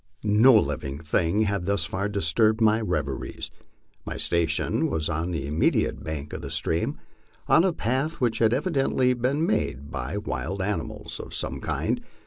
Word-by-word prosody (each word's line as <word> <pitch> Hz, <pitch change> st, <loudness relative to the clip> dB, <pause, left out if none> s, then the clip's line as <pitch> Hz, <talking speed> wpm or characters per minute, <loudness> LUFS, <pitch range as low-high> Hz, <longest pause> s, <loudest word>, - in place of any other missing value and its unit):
No 110 Hz, +5 st, +6 dB
living 75 Hz, -5 st, -1 dB
thing 80 Hz, +6 st, +1 dB
had 100 Hz, -3 st, -1 dB
thus 100 Hz, -5 st, +1 dB
far 95 Hz, +5 st, -2 dB
disturbed 105 Hz, +4 st, +2 dB
my 110 Hz, 0 st, +4 dB
reveries. 90 Hz, -9 st, -3 dB, 0.5 s
My -, -, -5 dB
station 85 Hz, -2 st, +1 dB
was 80 Hz, 0 st, -1 dB
on 80 Hz, +2 st, -1 dB
the 80 Hz, -6 st, -3 dB
immediate 75 Hz, +3 st, +1 dB
bank 75 Hz, -1 st, -5 dB
of -, -, -5 dB
the -, -, -6 dB
stream, 80 Hz, -, 0 dB, 0.5 s
on 165 Hz, -, +5 dB
a 190 Hz, -, +3 dB
path 135 Hz, +3 st, -1 dB
which 115 Hz, -3 st, +1 dB
had 110 Hz, -1 st, +4 dB
evidently 135 Hz, -3 st, +2 dB
been 130 Hz, +6 st, 0 dB
made 70 Hz, -, -1 dB
by -, -, -3 dB
wild 95 Hz, +3 st, -3 dB
animals 95 Hz, -5 st, -3 dB
of -, -, -7 dB
some -, -, -2 dB
kind. -, -, -1 dB
100 Hz, 160 wpm, -26 LUFS, 80-120 Hz, 0.5 s, No